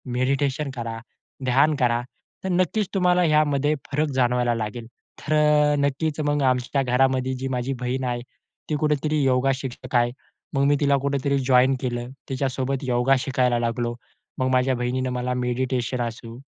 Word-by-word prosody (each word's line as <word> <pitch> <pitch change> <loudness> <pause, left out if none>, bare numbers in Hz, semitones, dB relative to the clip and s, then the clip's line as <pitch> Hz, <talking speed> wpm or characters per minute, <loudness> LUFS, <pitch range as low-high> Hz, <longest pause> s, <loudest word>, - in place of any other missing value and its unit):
Meditation 140 +3 0
करा, 115 -2 -5 0.5
ध्यान 140 +5 +3
करा. 120 -1 +2 0.4
तर 190 - -2
नक्कीच 185 +3 +1
तुम्हाला 180 -2 +3
ह्यामध्ये 150 -2 +2 0.2
फरक 150 +2 +1
जाणवायला 125 -2 +2
लागेल. 115 +1 -5 0.3
तर 155 - -2
अ, 150 -1 +4
नक्कीच 145 +2 -1
मग 145 0 +1
आमच्या 130 +1 +1
घरामध्ये 130 +1 +1
जी 130 +1 -4
माझी 130 +1 -2
बहीण 125 +2 -2
आहे. 120 -1 -2 0.5
ती 155 - +1
कुठेतरी 150 0 +1
योगा 130 +1 +3
शिक्षक 130 -1 -7
आहे. 120 0 +3 0.4
मग 135 -1 +2
मी 145 - +4
तिला 140 -1 +3
कुठेतरी 140 0 0
जॉइन 130 0 +4
केलं. 120 -1 -3 0.2
तिच्यासोबत 135 0 -2
योगा 125 +1 +2
शिकायला 125 -2 +1
लागलो. 120 0 -1 0.4
मग 130 - +1
माझ्या 130 +1 +2
बहिणीनं 125 +1 -1
मला 125 0 -2
मेडिटेशन 125 0 -1
असू, 115 0 -6
130 Hz, 155 wpm, -24 LUFS, 125-140 Hz, 0.5 s, अ